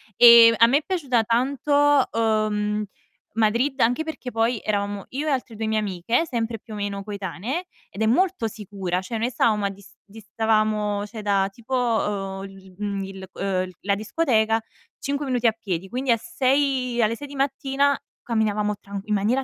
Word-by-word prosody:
E 235 -1 +9
a 230 - +7
me 270 +4 +4
è 300 - -2
piaciuta 275 - +1
tanto, 280 +4 +2
uhm, 215 -2 0 0.5
Madrid, 235 +5 +1
anche 245 +7 +2
perché 315 -5 -6
poi 225 0 0
eravamo 205 -1 -2
io 290 +4 -3
e - - +2
altre 255 -4 -2
2 220 - -3
mie 220 0 +1
amiche, 210 - 0
sempre, 225 -3 -2
più 220 - -12
o - - -5
meno, 200 -1 -3
coetanee, 205 - -4 0.2
ed 195 - -8
è - - +3
molto 335 +2 +2
sicura. 195 -4 -4
Cioè 225 +4 -5
noi 235 +3 -1
stavamo 215 -3 +1
a - - +1
dis 200 +1 -15
distavamo, 215 0 0
cioè, 220 0 -8
da 195 -1 +2
tipo, 235 +5 -9
uhm, 205 -5 -1
il 190 -1 -15
mhmm, 200 -1 -3
il 190 0 -8
uhm, 185 -2 -1
la 200 0 +1
discoteca, 220 0 +1 0.4
5 280 +1 -2
minuti 245 -3 +1
a - - +5
piedi, 195 -5 -5
quindi 255 +2 -1
a 230 - +4
6 265 -3 0
alle 225 +1 +2
6 290 - -8
di 285 - -10
mattina 275 +1 +1 0.2
camminavamo 210 -2 0
tran 200 0 -7
in 210 - 0
maniera 225 +7 +1
220 Hz, 180 wpm, -24 LUFS, 205-255 Hz, 0.5 s, E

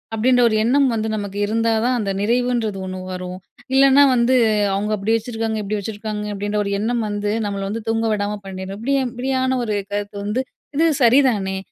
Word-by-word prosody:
அப்டீன்ற 245 +3 +3
ஒரு 215 - 0
எண்ணம் 270 +4 +3
வந்து 220 -1 -1
நமக்கு 200 -1 -5
இருந்தா 225 +2 +1
தான், 250 0 +2
அந்த 200 -2 -1
நிறைவுன்றது 235 -2 0
ஒண்ணு 185 0 -5
வரும். 180 0 -6 0.4
இல்லன்னா 275 +1 +6
வந்து, 245 +2 +3 0.4
அவங்க 205 +2 -1
அப்படி 205 +3 0
வச்சுருக்காங்க, 225 -1 -3
இப்படி 210 +1 -2
வச்சுருக்காங்க 210 0 -5
அப்படின்ற 205 +1 -2
ஒரு 200 - -3
எண்ணம் 230 +2 0
வந்து, 205 0 -2
நம்மள 200 -1 -3
வந்து 220 +1 -4
தூங்க 225 0 0
விடாம 205 0 -2
பண்ணிரும். 190 0 -6
இப்படி 275 +5 0
இப்படியான 260 +1 -1
ஒரு 215 -2 -1 0.2
கருத்து 205 0 -3
வந்து 210 +5 0 0.3
இது 320 +3 +3 0.2
சரிதானே? 230 -6 +3
220 Hz, 175 wpm, -20 LUFS, 205-245 Hz, 0.4 s, இல்லன்னா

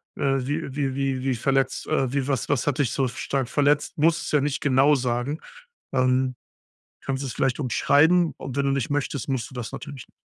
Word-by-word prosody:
äh, - - -4 0.2
wie 145 -2 -3
wie 135 -2 -1
wie 135 -2 -1
wie 130 -2 0
verletzt 135 +2 0
äh, 135 -4 0
wie 140 -2 0
was 135 -3 0
was 145 -4 +1
hat 145 - +1
dich 130 -5 +2
so, 135 - +1
f 125 - -5
stark 135 -2 -2
verletzt? 145 +1 +1
Musst 160 +2 +2
es - - -4
ja 150 - +4
nicht 145 +1 -1
genau 140 +2 +4
sagen. 125 +4 -1 0.5
Ähm, 130 0 +2 0.7
kannst 135 0 -2
du - - -3
es - - -5
vielleicht 135 0 0
umschreiben 155 +5 +3
und 130 - -7
wenn 140 - +1
du 140 - +2
nicht 135 -2 -1
möchtest, 145 -1 -2
musst 125 -4 -2
du - - -15
das 120 -3 -5
natürlich 135 -4 -8
n - - -28
135 Hz, 220 wpm, -24 LUFS, 130-145 Hz, 0.7 s, ja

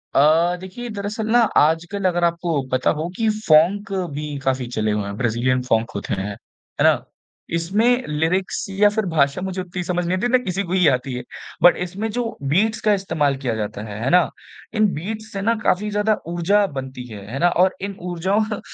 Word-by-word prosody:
अ, 160 +5 +4
देखिए 190 +7 -7
दरअसल 210 +1 -4
ना 240 - +5 0.2
आजकल 170 +6 +2
अगर 175 -1 0
आपको 170 -3 +1
पता 130 0 +2
हो 160 - -2
कि 225 - +1
फ़ॉन्क 205 0 +3 0.2
भी 150 0 -4
काफ़ी 130 -2 0
चले 110 -1 0
हुए 105 -1 -1
हैं 100 0 -5
ब्राज़ीलियन 125 +2 +1
फ़ॉन्क 115 -2 0
होते 100 - -3
हैं। 100 - -3 0.5
है - - +3
ना? - - +4 0.5
इसमें 220 +9 +2
लिरिक्स 165 +5 -1
या 200 +2 +4
फ़िर 215 0 -1
भाषा 140 +1 +2
मुझे 190 0 -3
उत्ती 180 0 -5
समझ 180 0 -1
नहीं 180 +2 0
आती 210 - 0
ना 255 +1 +4
किसी 195 -5 -2
को 180 -1 -4
ही 180 -4 +4
आती 130 0 +1
है। 125 0 -4 0.4
बट 175 - +7
इसमें 200 +5 -4
जो 245 +1 -1 0.3
बीट्स 220 +5 +2
का 210 - +6
इस्तेमाल 155 -8 0
किया 120 -3 0
जाता 105 -1 -4
है। 105 -1 -7
है 130 - +1
ना? 180 +1 +4 0.5
इन 215 -1 +4
बीट्स 215 +7 -5
से 195 - -3
ना 230 +3 +2
काफ़ी 210 +3 +1
ज़्यादा 210 +1 +1
ऊर्जा 175 +5 +2
बनती 130 -1 -7
है। 100 -2 -9
है 135 - -4
ना? 175 +3 +4
और 185 +2 +2
इन 200 0 -4
ऊर्जाओं 200 +5 0
175 Hz, 200 wpm, -21 LUFS, 140-205 Hz, 0.5 s, बट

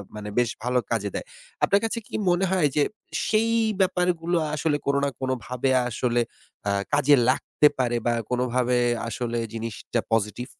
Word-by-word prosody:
মানে 105 0 -6
বেশ 120 -1 +3
ভালো 125 +1 +2
কাজে 105 -3 0
দেয়। - - -3 0.4
আপনার 200 - +4
কাছে 230 +1 -2
কি - - -7
মনে 175 +2 +3
হয় 180 -6 +3
যে 150 - +4 0.4
সেই 225 +1 +2 0.3
ব্যাপারগুলো 180 -2 +1 0.2
আসলে 150 0 +1
কোন 140 0 +1
না 140 - +2
কোনভাবে 130 0 -2 0.2
আসলে 120 +1 0 0.5
আ - - +2 0.2
কাজে 145 0 +5
লাগতে 150 +3 +3
পারে 120 -1 +1
বা 120 - +3 0.2
কোনভাবে 125 0 +1 0.3
আসলে 115 +1 -2
জিনিসটা 115 +1 -3
পজিটিভ। 115 +3 0
125 Hz, 155 wpm, -25 LUFS, 120-160 Hz, 0.5 s, কাজে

